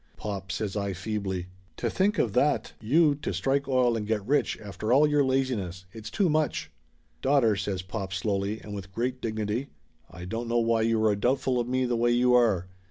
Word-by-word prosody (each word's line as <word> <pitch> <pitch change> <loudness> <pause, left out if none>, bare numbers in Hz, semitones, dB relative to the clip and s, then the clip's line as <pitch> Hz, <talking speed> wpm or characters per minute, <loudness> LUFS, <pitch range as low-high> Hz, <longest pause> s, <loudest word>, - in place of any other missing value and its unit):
"Pop!" 100 -3 -5
says 105 -2 -3
I 100 -1 -1
feebly. 95 -1 -3 0.3
"To - - -1
think 200 +2 +1
of 110 - +1
that 145 +5 +1
you 150 +7 +4
to 145 - -4
strike 140 +1 0
oil 125 -3 +3
and 105 -2 -3
get 105 -3 -1
rich 145 +5 +1
after 105 +1 -4
all 140 +4 +6
your 150 -1 +3
laziness! 125 -10 -1
It's 110 0 -8
too 200 -4 +1
much!" 155 -2 0 0.5
"Daughter," 130 -6 +3
says 95 -2 -3
pop 95 0 -5
slowly 100 +2 -1
and 105 - -8
with 95 -2 -7
great 125 +5 -2
dignity, 110 +4 -2 0.4
"I 90 +1 -9
don't 115 +5 -4
know 120 +1 +1
why 115 -1 +2
you 110 -1 +2
are 105 -1 +3
doubtful 125 +3 +1
of 120 - -1
me 130 0 +1
the 120 -1 0
way 120 +1 +2
you 125 +1 +3
are 110 -8 +3
115 Hz, 200 wpm, -27 LUFS, 100-130 Hz, 0.5 s, all